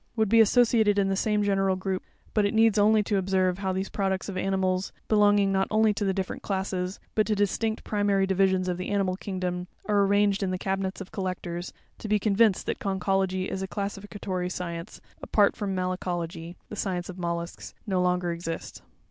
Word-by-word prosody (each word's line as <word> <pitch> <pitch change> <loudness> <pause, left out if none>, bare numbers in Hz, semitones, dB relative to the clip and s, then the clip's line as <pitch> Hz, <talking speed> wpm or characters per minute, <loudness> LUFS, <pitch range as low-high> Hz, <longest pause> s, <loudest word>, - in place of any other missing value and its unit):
would 220 -3 +1
be 230 +1 +7
associated 220 -2 +4
in 195 -1 +2
the 195 - +1
same 210 +1 +1
general 195 -1 +2
group: 185 0 -2 0.3
but 210 - +3
it 200 +2 0
needs 220 -1 +4
only 215 +1 +5
to 205 0 0
observe 185 -1 +1
how 190 -1 -1
these 190 +1 -2
products 190 -2 -1
of 195 - -5
animals, 185 0 0 0.2
belonging 205 -2 +4
not 190 0 +1
only 215 0 +3
to 200 -1 0
different 190 -1 -3
classes, 190 -1 -2
but 215 - +2
to 215 - +1
distinct 220 +2 0
primary 205 -2 +1
divisions 190 -1 +2
of 180 -1 -1
the 185 - -4
animal 195 -2 +1
kingdom, 185 -2 -4 0.2
are 205 -1 +3
arranged 200 0 +2
in 195 - 0
the 185 - -1
cabinets 190 +1 -2
of 190 - -9
collectors, 180 -2 -4 0.3
to - - -6
be 210 0 +3
con 205 0 0
vinced 215 -3 +4
that - - -3
Conchology 190 -1 0
as 190 - -4
a 190 - -3
classificatory 200 -2 -4
science, 170 -2 -6 0.2
apart 205 -2 +3
from 200 -2 -3
Malacology 175 -2 -3
(the - - -7
science 180 -3 -2
of 185 0 -8
mollusks), 170 0 -4
no 190 -4 0
longer 180 -1 +1
exists. 170 -1 -5
195 Hz, 190 wpm, -27 LUFS, 185-205 Hz, 0.3 s, be